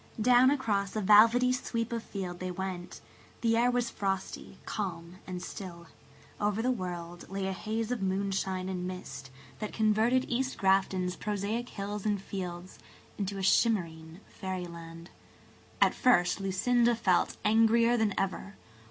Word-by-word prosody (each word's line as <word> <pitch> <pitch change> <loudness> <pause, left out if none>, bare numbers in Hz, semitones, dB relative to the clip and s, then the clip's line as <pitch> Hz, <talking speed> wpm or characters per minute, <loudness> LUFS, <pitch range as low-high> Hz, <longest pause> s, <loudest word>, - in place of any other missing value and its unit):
Down 250 +3 +6
across 210 -9 0
a 215 - 0
velvety 230 +5 +6
sweep 235 -2 -2
of 230 - -2
field 185 -5 -6
they 185 - -3
went; 180 -1 -5 0.4
the 230 -1 +3
air 240 +2 +4
was 245 -1 0
frosty, 195 0 -3
calm 180 -3 -5
and 180 -1 -5
still; 170 -3 -8 0.5
over 210 +2 0
the 255 - +2
world 175 -5 -5
lay 195 0 -3
a 190 - -1
haze 220 +4 -3
of 245 -4 -2
moonshine 190 -1 -1
[Page 190 0 -3
150] - - -4
and 180 - -3
mist 135 -6 -9 0.3
that 215 - -4
converted 220 +4 +2
East 260 +2 -1
Grafton's 190 -1 +2
prosaic 210 +4 -3
hills 205 0 -5
and 210 -2 0
fields 185 -2 -6 0.4
into 200 0 -2
a 195 - -4
shimmering 170 -5 +1
fairyland. 170 -3 -7 0.7
At - - +5
first 200 -6 +3
Lucinda 235 +5 +2
felt 200 -6 +1
angrier 225 +2 +4
than 220 -4 +1
ever. 195 0 -3
195 Hz, 150 wpm, -30 LUFS, 185-230 Hz, 0.7 s, Down